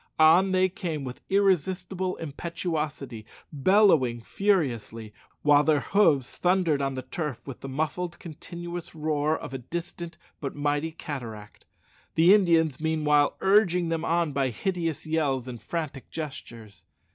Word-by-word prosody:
On 165 +5 +6
they 185 0 +3
came 175 -6 -4
with 125 -1 -7
irresistible 190 -1 +1
impetuosity, 150 -6 -4 0.3
bellowing 150 - +4
furiously, 120 - -1 0.3
while 145 0 +5
their 150 -3 +3
hoofs 155 -11 +2
thundered 175 -5 +2
on 135 -1 -1
the 130 - -5
turf 150 -7 -5
with 135 -3 -8
the 135 - -7
muffled 160 +5 -2
continuous 170 +1 -7
roar 155 0 0
of - - -8
a 135 - -4
distant 170 +4 -6 0.2
but 140 - -5
mighty 145 +2 -1
cataract; 115 -10 -8 0.5
the 170 +4 +7
Indians, 165 -8 +3
meanwhile, 150 -2 +2
urging 190 -4 +3
them 165 -1 -1
on 170 -2 +1
by 135 -1 0
hideous 165 - -3
yells 145 -5 0
and 120 -4 -7
frantic 150 0 -5
gestures. 120 -8 -8
155 Hz, 135 wpm, -27 LUFS, 135-175 Hz, 0.5 s, the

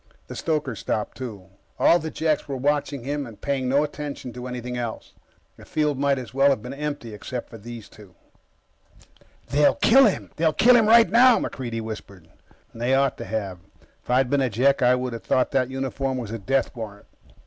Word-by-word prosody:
The - - -9
stoker 150 -5 -1
stopped, 105 +1 -3
too. 105 -8 -8 0.3
All 170 - +5
the 160 0 -5
Jeks 155 -1 -1
were 140 -2 -4
watching 140 -1 -1
him 145 +1 -3
and 110 -3 -13
paying 135 -3 -1
no 140 +3 +3
attention 145 -4 -6
to 125 0 -7
anything 125 0 -5
else. 120 -2 -5 0.4
The - - -14
field 150 -3 -1
might 140 -1 +2
as 125 -1 -7
well 135 +1 +4
have 130 -6 0
been 125 +2 -6
empty 145 -6 -5
except 120 +4 -6
for 115 - -10
those 115 0 -9
two. 100 -5 -17 1.3
"They'll 145 +1 +4
kill 270 +4 +6
him. 200 - -3
They'll 160 -1 +2
kill 245 +9 +6
him 225 -3 +4
right 230 +1 +7
now," 245 +1 +6
MacReidie 120 -4 -4
whispered. 100 -6 -9 0.4
They 120 +3 0
ought 135 -1 +2
to - - -5
have. 100 -3 -4 0.4
If - - -26
I'd 125 +1 +3
been 140 -1 +2
a 130 - +1
Jek, 135 +5 +2
I 125 0 +5
would 125 -1 -3
have 115 - -7
thought 130 - +1
that 130 -2 +1
uniform 135 0 -3
was 115 -4 -5
a 115 - -4
death 135 +8 -1
warrant. 105 -3 -8
130 Hz, 200 wpm, -24 LUFS, 115-145 Hz, 1.3 s, right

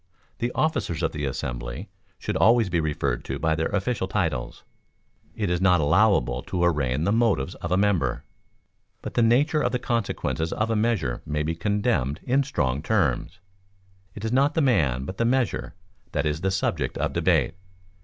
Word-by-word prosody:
The 120 +1 -1
officers 90 - 0
of 80 - +1
the 75 -2 -3
assembly - - -4 0.3
should - - -4
always 115 -3 +4
be 85 - +2
referred 75 -6 -1
to - - -3
by 80 +1 +1
their 80 +1 0
official 100 0 -1
titles. - - -2 0.7
It 105 -5 -1
is 90 0 0
not 90 -2 +4
allowable 85 - +3
to 90 +4 -2
arraign 75 -4 +1
the 100 - +1
motives 110 - +1
of 85 - -4
a 90 - +3
member, 95 -11 +1 0.8
but - - -5
the 120 - +2
nature 140 +7 +3
or - - +2
consequences 115 - -2
of 110 +1 -1
a - - +1
measure 105 - 0
may 75 0 -2
be 80 +2 -1
condemned 85 - 0
in 135 +3 +2
strong 70 - -1
terms. - - 0 0.8
It 105 - -6
is 110 - -1
not 140 +4 +3
the 160 - +3
man, 75 - +2
but 95 +6 -6
the - - +1
measure, 125 -1 0 0.4
that - - 0
is 75 +1 -1
the 95 - +1
subject 95 0 -1
of - - -1
debate. - - +2
95 Hz, 175 wpm, -25 LUFS, 75-115 Hz, 0.8 s, always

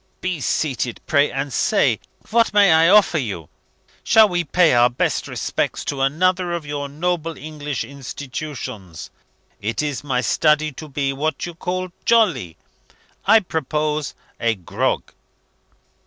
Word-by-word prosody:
Be 185 -3 -3
seated, 130 -5 -1
pray 145 -1 +3
and 135 -1 -3
say, - - +2 0.3
what 230 -1 +3
may 200 -3 +6
I 160 +1 +5
offer 200 -5 +5
you? 100 - -5 0.5
Shall 220 -2 +6
we 175 -3 -1
pay 170 0 +3
our 120 0 +5
best 120 - -1
respects - - -2
to 140 -2 -3
another 175 +5 +1
of 170 -3 -4
your 145 -1 -4
noble 165 +1 -2
English 150 -2 -5
institutions? 130 - -7 0.5
It 110 +7 -2
is 145 -2 -3
my 130 -3 0
study 150 +3 +2
to 155 +3 -9
be, 135 -1 -1
what 155 +4 -2
you 175 - -7
call, 185 +2 -3
jolly. 175 - +2 0.7
I 220 +2 +7
propose 155 -3 -2 0.2
a 115 -1 +1
grog." 90 -4 -2
150 Hz, 140 wpm, -21 LUFS, 135-175 Hz, 0.7 s, I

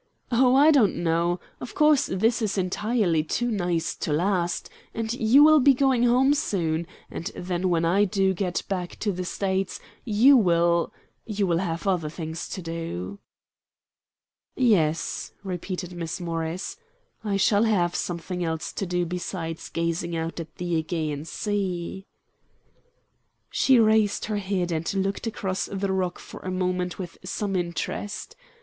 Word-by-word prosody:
"Oh, 250 +1 +4
I 295 +3 +7
don't 255 -9 +4
know. 170 +1 +1 0.2
Of 245 - -8
course 300 -2 +4
this 225 +6 +1
is 210 -2 -1
entirely 185 -2 +1
too 240 +9 -1
nice 175 -5 0
to - - -3
last, 175 +2 0 0.3
and 225 0 -2
you 245 +4 +5
will 310 0 +7
be 275 0 +5
going 265 -2 +3
home 255 +4 +4
soon, 170 - -1 0.2
and 165 - -6
then 180 0 -2
when 165 -1 +2
I 195 +5 +4
do 190 -1 +1
get 180 -1 -2
back 180 -3 -3
to 210 - +1
the 185 -1 -4
States 190 +1 -2 0.2
you 245 +5 +6
will 170 -4 +3 0.4
you 210 -2 0
will 170 -2 +1
have 170 -1 -3
other 180 -6 +1
things 160 0 -6
to 185 - -5
do." 165 - -5 1.4
"Yes," 165 -10 +1
repeated 180 -1 -4
Miss 170 0 -4
Morris, 165 +1 -3 0.5
"I 205 -2 0
shall 205 +2 +3
have 180 -6 +2
something 180 +1 -3
else 160 -2 -3
to 195 - -3
do 180 0 0
besides 170 -1 -5
gazing 170 0 -2
out 165 +1 -3
at 160 -1 -8
the 175 -2 -1
AEgean 155 -3 -3
Sea." 190 -2 -3 1.4
She 260 -3 +4
raised 215 -2 +3
her 215 -1 -2
head 190 -3 -1
and 160 0 -1
looked 195 +4 -1
across 190 -4 -2
the 195 0 -2
rock 185 -2 -1
for - - -11
a 185 - -6
moment 180 -1 -1
with 180 -3 -7
some 195 +1 -2
interest. 175 +4 -3
185 Hz, 150 wpm, -25 LUFS, 170-210 Hz, 1.4 s, I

